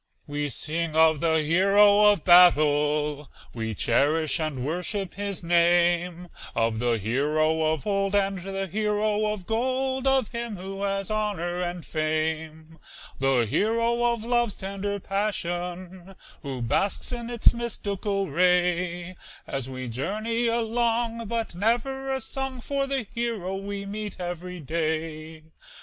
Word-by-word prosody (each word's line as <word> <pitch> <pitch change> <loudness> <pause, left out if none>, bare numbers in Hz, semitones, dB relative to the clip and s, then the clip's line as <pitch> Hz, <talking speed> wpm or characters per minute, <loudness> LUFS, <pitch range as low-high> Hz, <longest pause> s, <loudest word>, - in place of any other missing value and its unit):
We 145 0 -3
sing 160 +4 -1
of 160 -1 +5
the 160 -1 +2
hero 200 +5 +5
of 200 -6 -1
battle, 150 -4 +4 0.2
We 110 -2 -4
cherish 155 - +2
and 150 -5 -3
worship 180 +4 -2
his 200 -2 -4
name; 175 +1 +2 0.3
Of 115 -1 +1
the 120 -1 +1
hero 150 +9 +1
of 155 -3 -3
old, 195 -1 0
and 195 -1 +1
the 195 +1 -4
hero 210 +2 0
of 205 -4 -6
gold, 260 +4 -1
Of 265 -5 +2
him 235 -3 -5
who 195 +2 -7
has 195 0 -1
honor 185 -5 -1
and 175 -1 -4
fame. 155 0 -3 0.4
The 135 -3 +2
hero 230 - +1
of 230 -2 -4
love's 240 -3 +1
tender 200 +1 -4
passion, 185 -2 -4 0.3
Who 135 -4 -5
basks 195 - 0
in 240 -1 -5
its 240 -2 +4
mystical 200 -4 -2
ray, 180 0 +1 0.3
As 135 -2 -4
we 130 -1 -6
journey 215 - -1
along, 230 0 0
but 230 -2 -3
never 245 +8 -1
a 265 0 -1
song 265 -1 -3
For 275 +3 -2
the 270 -4 -1
hero 225 -6 -2
we 200 +1 -5
meet 205 -1 -6
every 180 0 -5
day. 155 0 -3
185 Hz, 130 wpm, -26 LUFS, 160-215 Hz, 0.4 s, of